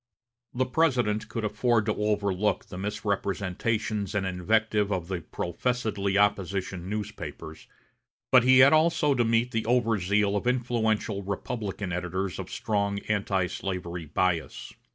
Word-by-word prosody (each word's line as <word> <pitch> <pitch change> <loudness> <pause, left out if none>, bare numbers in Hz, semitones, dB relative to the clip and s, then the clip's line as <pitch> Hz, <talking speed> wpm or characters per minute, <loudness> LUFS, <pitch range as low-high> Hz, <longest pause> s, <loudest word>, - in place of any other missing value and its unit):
The 130 +1 0
President 125 -8 +1
could 115 -3 -3
afford 115 0 +1
to 105 - +1
overlook 105 -1 0
the 90 - -9
misrepresentations 100 +1 -2
and 100 -2 0
invective 105 +3 +1
of 90 -2 -2
the 90 -3 -2
professedly 100 +3 -2
opposition 95 -2 0
newspapers, 85 -7 -6 0.6
but 130 -2 +7
he 130 +1 +6
had 140 - +5
also 155 -2 +3
to 120 -2 +2
meet 115 +2 +1
the 110 -1 -2
over 115 -3 +2
zeal 100 +2 +1
of 105 - -1
influential 115 -4 0
Republican 100 -1 -4
editors 90 +1 -3
of - - -6
strong 100 -1 -1
antislavery 90 -3 -2
bias. 85 +1 -1
105 Hz, 130 wpm, -27 LUFS, 95-115 Hz, 0.6 s, but